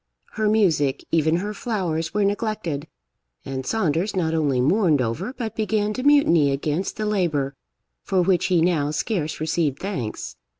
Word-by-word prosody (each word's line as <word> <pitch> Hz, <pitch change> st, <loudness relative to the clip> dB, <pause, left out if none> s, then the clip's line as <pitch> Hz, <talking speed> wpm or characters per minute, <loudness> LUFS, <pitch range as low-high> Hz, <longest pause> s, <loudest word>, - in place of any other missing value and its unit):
Her 215 Hz, -1 st, 0 dB
music, 165 Hz, -11 st, +2 dB
even 160 Hz, 0 st, +3 dB
her 205 Hz, +4 st, -2 dB
flowers, 175 Hz, -8 st, -2 dB
were 205 Hz, 0 st, +1 dB
neglected, 200 Hz, -8 st, -2 dB, 0.6 s
and 130 Hz, -1 st, -5 dB
Saunders 190 Hz, -2 st, 0 dB
not 165 Hz, -3 st, 0 dB
only 145 Hz, -5 st, +1 dB
mourned 155 Hz, -, +3 dB
over, 130 Hz, -, -2 dB
but 230 Hz, -5 st, -5 dB
began 215 Hz, -1 st, 0 dB
to 255 Hz, -, -4 dB
mutiny 255 Hz, -, +4 dB
against, 150 Hz, +6 st, -2 dB
the 215 Hz, -, -2 dB
labour 165 Hz, -10 st, 0 dB, 0.5 s
for 185 Hz, -2 st, +1 dB
which 180 Hz, -1 st, +2 dB
he 180 Hz, -3 st, +3 dB
now 160 Hz, -5 st, +1 dB
scarce 155 Hz, 0 st, -2 dB
received 155 Hz, -3 st, 0 dB
thanks. 110 Hz, -, -5 dB
170 Hz, 155 wpm, -23 LUFS, 150-210 Hz, 0.6 s, mutiny